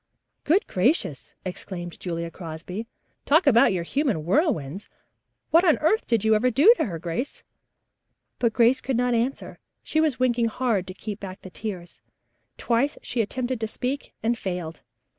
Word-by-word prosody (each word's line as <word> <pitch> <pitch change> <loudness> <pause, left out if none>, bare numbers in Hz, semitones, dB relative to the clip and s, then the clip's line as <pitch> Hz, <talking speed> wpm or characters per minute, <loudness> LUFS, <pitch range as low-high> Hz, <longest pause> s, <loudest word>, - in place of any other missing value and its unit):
"Good 350 +7 +3
gracious," 180 - 0
exclaimed 180 -2 -5
Julia 170 -1 -4
Crosby. 175 +6 -7 0.4
"Talk 315 +5 +4
about 235 -7 +6
your 180 -3 -1
human 255 - 0
whirlwinds! 195 - 0 0.6
What 335 +2 +6
on 330 -5 +4
earth 420 +9 +1
did 230 -4 +1
you 220 - +5
ever 225 +4 +3
do 290 - +7
to - - +2
her, 175 -6 -4
Grace?" 170 - -4 1.0
But 235 -2 +2
Grace 235 +3 +3
could 260 -3 -1
not 245 0 +1
answer. 235 +4 -2 0.2
She 315 - +1
was 300 -6 +1
winking 240 -2 +2
hard 225 -5 0
to 185 - -8
keep 210 -1 -6
back 190 -1 -8
the 185 - -10
tears. 185 -5 -7 0.6
Twice 250 +5 +1
she 240 - -1
attempted 250 +3 -2
to 220 - -2
speak 255 +5 -4
and 235 +2 +2
failed. 180 -6 -5
230 Hz, 160 wpm, -25 LUFS, 180-260 Hz, 1.0 s, do